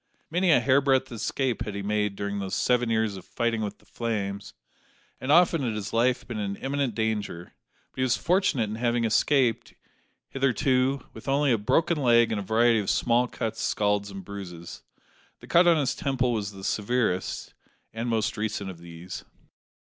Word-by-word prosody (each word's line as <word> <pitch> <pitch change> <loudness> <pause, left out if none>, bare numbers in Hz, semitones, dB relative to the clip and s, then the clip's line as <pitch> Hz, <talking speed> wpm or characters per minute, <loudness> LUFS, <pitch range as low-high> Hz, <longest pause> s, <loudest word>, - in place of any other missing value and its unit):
Many 180 +2 +2
a 155 - +6
hairbreadth 130 +1 +2
escape 120 +2 -2
had 105 - -6
he 100 - -4
made 105 0 0
during 100 0 -3
these 95 -1 -3
seven 120 +3 +2
years 110 -3 0
of 95 - -10
fighting 115 -1 -1
with 105 -1 -4
the - - -26
flames, 100 -4 -4 0.6
and 130 - -2
often 170 -1 +5
had 120 -5 -1
his 105 -2 -5
life 120 +2 +1
been 120 -4 -4
in 100 -1 -2
imminent 135 -3 -2
danger; 105 -6 -3 0.4
but - - -34
he - - -1
was 130 -1 +2
fortunate 175 - +1
in 105 +1 -5
having 120 0 0
escaped, 120 +2 +1 0.5
hitherto, 135 0 +1
with 110 - -12
only 140 0 +2
a 115 - +3
broken 165 +10 +1
leg 120 -2 +4
and 110 - -1
a - - -4
variety 115 +3 +3
of 100 - -2
small 120 +1 +2
cuts, 110 -2 -4
scalds, 105 -1 0
and 95 -2 -9
bruises. 90 -4 -8 0.6
The - - -13
cut 175 +1 +4
on 170 -1 +6
his 140 -4 +1
temple 130 -3 0
was 105 -2 -2
the 95 -1 -11
severest, 105 -3 -1 0.4
and 115 +2 -3
most 115 0 0
recent 105 -2 -3
of 85 - -13
these. 85 +1 -9
115 Hz, 180 wpm, -26 LUFS, 100-130 Hz, 0.6 s, a